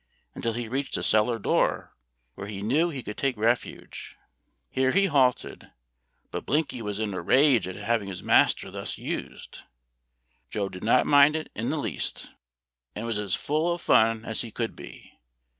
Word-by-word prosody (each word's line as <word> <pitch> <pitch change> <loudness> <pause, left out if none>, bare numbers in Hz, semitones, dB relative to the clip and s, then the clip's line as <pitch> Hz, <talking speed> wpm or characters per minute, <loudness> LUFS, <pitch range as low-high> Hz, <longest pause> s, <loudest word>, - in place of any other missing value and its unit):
until 115 - -2
he 120 0 -4
reached 135 +4 -2
a - - -4
cellar 110 +2 +2
door, 105 - 0 0.4
where 100 - -8
he 100 -1 -6
knew 150 +11 +2
he 135 -6 -6
could 105 - -7
take 135 -4 0
refuge. 115 +3 -2 0.5
Here 130 0 +2
he 195 +8 +3
halted; 135 -8 +1 0.6
but - - -4
Blinky 145 -4 -1
was 105 -1 -4
in 105 -2 -2
a 95 - -3
rage 130 -7 +4
at 95 - -6
having 105 0 -1
his 95 -2 -7
master - - +3
thus - - -5
used. - - -6 0.9
Joe 100 -2 -2
did 90 -1 -10
not 115 +3 +4
mind 145 +1 +6
it 160 - -4
in - - -3
the - - -1
least, - - -4 0.6
and 110 - -4
was 115 -3 -2
as 100 -3 -1
full 155 +4 0
of 170 - -2
fun 115 -4 +3
as 110 - -2
he 120 - -6
could 115 +1 -4
be. - - -13
115 Hz, 175 wpm, -26 LUFS, 105-140 Hz, 0.9 s, mind